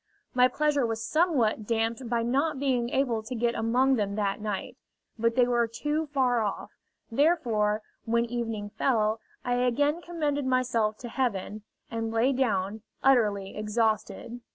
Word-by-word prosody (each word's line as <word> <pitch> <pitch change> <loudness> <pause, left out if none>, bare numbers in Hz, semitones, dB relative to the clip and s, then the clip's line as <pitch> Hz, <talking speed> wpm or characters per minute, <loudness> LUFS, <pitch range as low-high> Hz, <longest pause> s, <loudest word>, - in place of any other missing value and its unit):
My 250 0 +5
pleasure 295 +1 +1
was 225 -1 -2
somewhat 260 - +1
damped 230 +2 -1
by 235 -1 +1
not 275 +5 +1
being 250 -4 +1
able 245 -4 0
to 225 +4 -6
get 235 0 +1
among 250 +4 +2
them 200 -2 -1
that 205 0 -1
night. 215 +4 -4 0.4
But 230 +1 +2
they 250 -1 +5
were 240 -1 +2
too 295 +7 -2
far 255 -4 +1
off; 205 -2 -3 0.4
therefore, 225 -7 +2 0.2
when 235 +1 +2
evening 225 -3 -4
fell, 220 -3 +1 0.3
I 245 0 +1
again 285 +6 +1
commended 295 -6 -2
myself 235 -4 +1
to 245 - -6
Heaven, 215 -4 -2 0.3
and 225 -1 -2
lay 230 +4 +2
down, 220 -5 0 0.2
utterly 210 -7 +2
exhausted. 220 +2 -1
235 Hz, 150 wpm, -28 LUFS, 220-265 Hz, 0.4 s, My